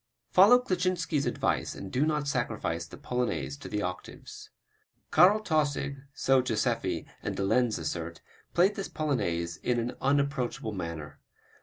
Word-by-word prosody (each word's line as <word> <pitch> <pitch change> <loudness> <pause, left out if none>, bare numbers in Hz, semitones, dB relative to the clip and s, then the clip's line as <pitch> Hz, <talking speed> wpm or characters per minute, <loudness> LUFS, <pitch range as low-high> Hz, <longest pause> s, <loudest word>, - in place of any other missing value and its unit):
Follow 205 +7 +8
Kleczynski's 185 - 0
advice - - -1
and 95 - -8
do 140 +5 +2
not 150 -2 0
sacrifice 110 - -2
the - - -11
Polonaise 85 - -2
to - - -9
the 105 -1 -2
octaves. 90 0 -7 0.6
Karl 200 +4 +6
Tausig, 145 -6 0
so 135 -1 +3
Joseffy 115 -4 -1 0.2
and - - -3
de 100 - 0
Lenz 120 +3 +2
assert, 85 +1 -4 0.4
played 185 +4 +5
this 195 -1 -5
Polonaise 85 - -1
in 120 +4 0
an 120 +2 -3
unapproachable 140 -5 0
manner. 80 -6 -6
125 Hz, 140 wpm, -29 LUFS, 90-150 Hz, 0.6 s, Follow